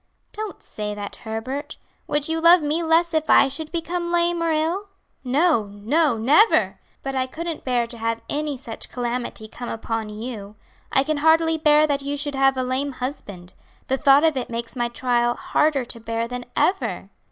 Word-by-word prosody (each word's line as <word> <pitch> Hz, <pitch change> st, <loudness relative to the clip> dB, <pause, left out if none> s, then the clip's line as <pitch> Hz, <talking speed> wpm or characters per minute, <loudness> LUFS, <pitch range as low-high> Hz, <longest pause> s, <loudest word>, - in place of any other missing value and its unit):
"Don't 430 Hz, -1 st, -6 dB
say 210 Hz, -1 st, -5 dB
that, 205 Hz, -1 st, -7 dB
Herbert. 260 Hz, +7 st, -5 dB, 0.3 s
Would 295 Hz, -1 st, -1 dB
you 325 Hz, 0 st, 0 dB
love 340 Hz, 0 st, +7 dB
me 300 Hz, +3 st, 0 dB
less 330 Hz, +1 st, +2 dB
if 315 Hz, -1 st, 0 dB
I 275 Hz, -, +7 dB
should 305 Hz, +3 st, -5 dB
become 345 Hz, +1 st, -2 dB
lame 345 Hz, 0 st, +2 dB
or 335 Hz, -1 st, +1 dB
ill?" 330 Hz, +6 st, 0 dB, 0.4 s
"No, 275 Hz, -2 st, +2 dB
no, 230 Hz, +7 st, +1 dB
never! 295 Hz, -, +4 dB, 0.2 s
but 270 Hz, 0 st, -3 dB
I 260 Hz, 0 st, 0 dB
couldn't 330 Hz, +4 st, -5 dB
bear 245 Hz, -2 st, +1 dB
to 235 Hz, 0 st, -10 dB
have 230 Hz, 0 st, -2 dB
any 295 Hz, -1 st, -2 dB
such 240 Hz, -3 st, -6 dB
calamity 240 Hz, -2 st, -3 dB
come 240 Hz, +2 st, -7 dB
upon 225 Hz, -1 st, -3 dB
you. 210 Hz, -1 st, -7 dB, 0.4 s
I 270 Hz, -, +3 dB
can 305 Hz, +1 st, -1 dB
hardly 320 Hz, +1 st, +3 dB
bear 300 Hz, -1 st, +5 dB
that 285 Hz, -2 st, 0 dB
you 285 Hz, +1 st, -3 dB
should 290 Hz, 0 st, -2 dB
have 270 Hz, 0 st, +3 dB
a 255 Hz, -, 0 dB
lame 265 Hz, +2 st, -2 dB
husband. 205 Hz, -9 st, -7 dB, 0.4 s
The 265 Hz, -, +2 dB
thought 280 Hz, +1 st, +5 dB
of 320 Hz, -2 st, +3 dB
it 255 Hz, -, -3 dB
makes 235 Hz, +1 st, -5 dB
my 240 Hz, -1 st, 0 dB
trial 240 Hz, 0 st, 0 dB
harder 295 Hz, -4 st, +1 dB
to 235 Hz, -1 st, -7 dB
bear 230 Hz, +1 st, -3 dB
than 250 Hz, 0 st, -6 dB
ever." 385 Hz, +2 st, 0 dB
270 Hz, 185 wpm, -23 LUFS, 235-315 Hz, 0.4 s, love